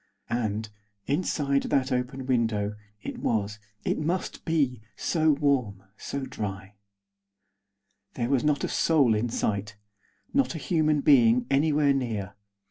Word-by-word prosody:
And, 110 -2 -1 0.4
inside 140 -2 +1
that 135 0 +1
open 125 +1 -2
window, 110 -5 0 0.3
it - - -5
was, 105 -1 -1 0.3
it - - 0
must 170 +4 -2
be, 140 -8 +1
so 160 -2 +1
warm, 135 -9 +1
so 140 +4 -5
dry! 100 -6 -6 1.4
There 120 0 -1
was 135 -3 +2
not 150 -1 +1
a - - +1
soul 145 -8 +3
in 110 +3 0
sight. 105 -2 -2 0.6
Not 275 -9 +2
a - - -2
human 155 -2 +1
being 125 -4 +5
anywhere 145 0 +3
near. 110 -7 -2
130 Hz, 130 wpm, -27 LUFS, 110-145 Hz, 1.4 s, being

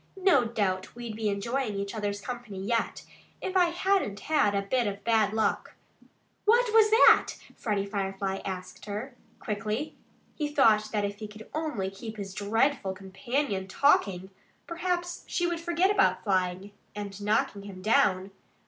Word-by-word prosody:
No 365 -10 +4
doubt 200 -5 -2
we'd 235 -2 -6
be 215 -1 -1
enjoying 215 +3 -2
each 200 0 -3
other's 205 -2 -3
company 240 -4 -6
yet, 230 +4 -1 0.3
if 375 - -4
I 365 -1 +6
hadn't 345 - 0
had 285 -10 +2
a 200 - 0
bit 240 +3 0
of 200 0 -5
bad 220 -3 +3
luck." 220 0 -1 0.7
"What 465 +1 +4
was 440 -1 +6
that?" 445 +3 +6 0.2
Freddie 205 -3 -1
Firefly 195 -1 -3
asked 185 -1 -6
her 210 +6 -5 0.3
quickly. 215 +5 -3 0.4
He 300 - -2
thought 225 -8 +4
that 210 -2 0
if 205 +1 -5
he 215 - -5
could 215 +1 -12
only 275 -12 -2
keep 220 +3 -8
his 195 -2 -6
dreadful 210 +1 +1
companion 195 +2 -3
TALKING, 190 -6 +2 0.3
perhaps 350 +1 -3
she 350 - 0
would 345 -1 -1
forget 345 +3 +2
about 410 -1 +2
FLYING 185 0 0 0.2
and 205 -1 -6
knocking 210 -1 +1
him 195 -2 -10
down. 200 -5 +2
215 Hz, 155 wpm, -28 LUFS, 200-285 Hz, 0.7 s, I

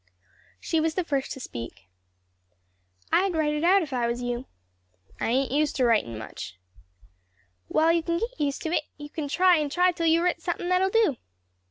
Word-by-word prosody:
She 325 - 0
was 315 0 0
the 370 - 0
first 280 -5 -2
to - - -9
speak. 115 - -8 1.2
"I'd 375 -1 +2
write 305 -1 +1
it 300 +1 -2
out 375 +2 +5
if 290 -4 -7
I 240 -2 +1
was 235 +1 -2
you." 245 +1 -3 0.7
"I - - -1
ain't 260 +3 +1
used 295 +1 +1
to 255 - +2
writin' 210 - +1
much." 110 -4 -8 1.1
"Well, 320 +1 +3
you 335 - +2
can 335 +1 -1
get 465 +3 -4
used 280 -1 -1
to 320 - -2
it; 310 - 0
you 295 0 -9
can 310 -3 -4
try 360 +4 +4
and 300 -2 -1
try 360 +3 +3
till 335 -1 -1
you've 330 +1 +4
writ 355 -2 0
somethin' 350 0 -3
that'll 365 +1 +3
do." 410 - +2
310 Hz, 195 wpm, -26 LUFS, 260-350 Hz, 1.2 s, out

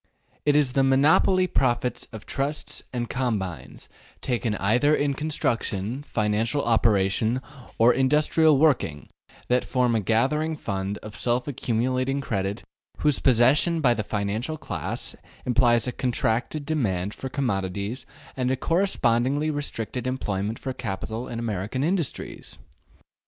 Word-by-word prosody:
It 145 - +5
is 145 -4 +3
the 135 - +3
``monopoly'' 150 +7 +4
profits 125 -1 0
of 110 -3 -9
trusts 140 +2 -2
and 120 -2 -3
combines, 95 - -3 0.3
taken 120 -4 -1
either 120 +10 +3
in 145 -1 +1
construction, 125 -6 -2
financial 110 +2 0
operation, 110 +1 +2 0.4
or 115 +2 +6
industrial 150 +3 +3
working, 130 - +1 0.4
that 125 0 +2
form 125 -2 +1
a 115 - +2
gathering 135 - +1
fund 100 -6 -3
of 105 -1 -8
self 125 +2 0
accumulating 130 +1 -1
credit 100 -5 -2 0.4
whose 150 -3 +2
possession 135 +7 +4
by 125 -6 +4
the 110 - -2
financial 105 +9 -2
class 100 - -3 0.3
implies 120 -1 +3
a - - 0
contracted 125 +4 -1
demand 105 - -1
for 135 - -6
commodities 105 -1 -2 0.3
and 125 -1 0
a 130 - +1
correspondingly 145 -4 +1
restricted 130 -4 -3
employment 105 -4 -2
for 130 - -4
capital 115 0 -4
in 120 - -5
American 110 +2 -2
industries. 170 -2 -3
125 Hz, 125 wpm, -25 LUFS, 110-140 Hz, 0.4 s, or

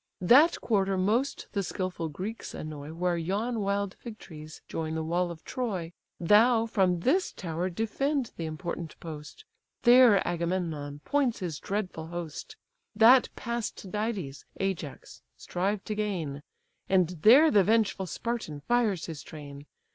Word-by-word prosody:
That 275 - +6
quarter 195 -3 +1
most 225 +9 0
the 200 - -1
skilful 185 -3 -3
Greeks 195 +9 -6
annoy, 150 -1 -7
Where 175 +1 0
yon 205 +8 -1
wild 200 -1 -1
fig 230 -3 -8
trees 155 -4 -11
join 160 -1 -3
the 160 - -2
wall 175 +2 0
of 165 -2 -9
Troy; 190 -10 -3 0.3
Thou, 225 +6 +5
from 185 -6 +1
this 345 - +2
tower 175 0 -3
defend 245 - -1
the 165 - -4
important 160 +1 -6
post; 155 - -9 0.4
There 240 -4 +6
Agamemnon 170 -4 -2
points 275 -5 +1
his 170 -7 -4
dreadful 185 -6 -4
host, 170 -2 -7 0.4
That 240 +4 +7
pass 235 -3 -3
Tydides, 200 -8 -4 0.2
Ajax, 190 -7 -4 0.2
strive 195 +3 -2
to 215 - -3
gain, 180 -10 -3 0.5
And 185 -3 +3
there 275 - +7
the 205 -3 +5
vengeful 210 -2 +1
Spartan 215 -10 -4
fires 215 -5 +1
his 160 -5 -7
train. 145 -2 -10
190 Hz, 140 wpm, -28 LUFS, 165-225 Hz, 0.5 s, That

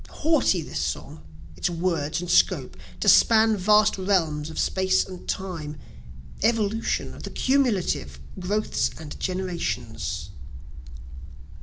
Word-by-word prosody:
Haughty 295 - +1
this 75 - -5
song, 75 +1 -4 0.3
its 160 - -1
words 165 -2 -1
and 180 - -5
scope, - - +2 0.3
To - - -1
span 220 -1 +6
vast 210 +1 +3
realms 165 -6 0
of 160 - -9
space 190 0 +1
and 185 -1 -10
time, 165 -6 -4 0.6
Evolution 225 0 0
the - - -7
cumulative 220 - 0 0.2
growths 205 +4 0
and 155 -2 -9
generations. 170 - -3
185 Hz, 110 wpm, -25 LUFS, 155-210 Hz, 0.6 s, span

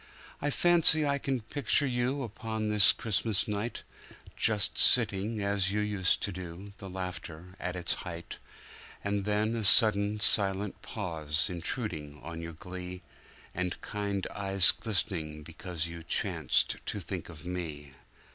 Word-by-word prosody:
I 145 - -1
fancy 165 0 +5
I 140 0 -1
can 135 -3 -3
picture 145 +5 0
you 130 +2 -2
upon 110 -1 -5
this 105 -1 +5
Christmas 105 -1 -1
night, 105 +2 -5 0.5
Just 105 -4 +2
sitting 105 -2 +6
as 100 -1 -1
you 105 - -2
used 105 -3 -1
to 100 - -2
do, 95 +2 -10
the 100 - -9
laughter 90 -1 -8
at 90 0 -5
its 90 -1 -2
height; 85 -2 -9 0.6
And 100 -1 -3
then 105 +2 -1
a 115 - -4
sudden, 105 -1 +5
silent 100 -1 +3
pause 80 -6 -3
intruding 85 - -6
on 85 0 -8
your 85 0 -8
glee, 90 +2 -9 0.5
And 90 0 -4
kind 100 -2 -4
eyes 95 -3 +5
glistening 85 -8 -4
because 85 +1 -6
you 85 0 -8
chanced 85 -3 -1
to - - -3
think - - -7
of 80 -1 -13
me. 80 -6 -7
100 Hz, 140 wpm, -28 LUFS, 85-110 Hz, 0.6 s, sitting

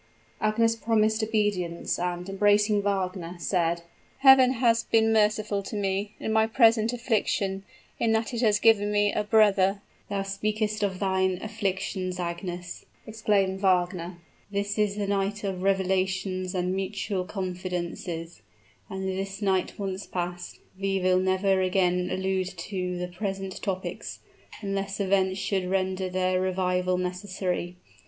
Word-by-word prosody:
Agnes 225 +1 +2
promised 220 -1 +1
obedience, 205 -6 -1
and, 180 0 -2
embracing 205 +1 +3
Wagner, 185 -3 -2
said, 170 -1 0 0.4
"Heaven 265 -2 +7
has 230 -2 +3
been 225 -1 +2
merciful 210 -1 +2
to 195 - -7
me, 200 +1 -2
in 220 - -2
my 220 0 +4
present 225 -1 +4
affliction, 210 -5 -1 0.4
in 230 - +2
that 225 +2 0
it 235 - -1
has 215 -3 +4
given 210 -1 +4
me 205 0 +2
a 210 - 0
brother!" 205 -2 +3 0.3
"Thou 200 -1 -1
speakest 210 +2 -2
of 195 -2 0
thine 190 -1 +1
afflictions, 190 -3 -2
Agnes!" 175 0 -5 0.2
exclaimed 205 -3 0
Wagner; 180 -2 +1 0.3
"this 205 +1 -2
is 205 -1 +2
the 205 -1 -2
night 200 +1 -1
of 190 -2 -3
revelations 190 -1 0
and 180 0 0
mutual 195 0 -2
confidences 180 -3 -5 0.5
and 190 -1 -4
this 195 +1 -3
night 190 -3 0
once 195 -1 -4
passed, 175 0 -4 0.2
we 195 0 0
will 185 0 +3
never 190 +1 +2
again 180 -1 +1
allude 190 0 -1
to 180 0 -3
the 180 0 -3
present 195 +1 -5
topics, 190 -2 -4 0.5
unless 195 0 -3
events 190 -1 +2
should 190 -2 -1
render 190 0 0
their 185 0 +1
revival 185 -1 0
necessary. 180 -1 -3
195 Hz, 135 wpm, -27 LUFS, 185-210 Hz, 0.5 s, Heaven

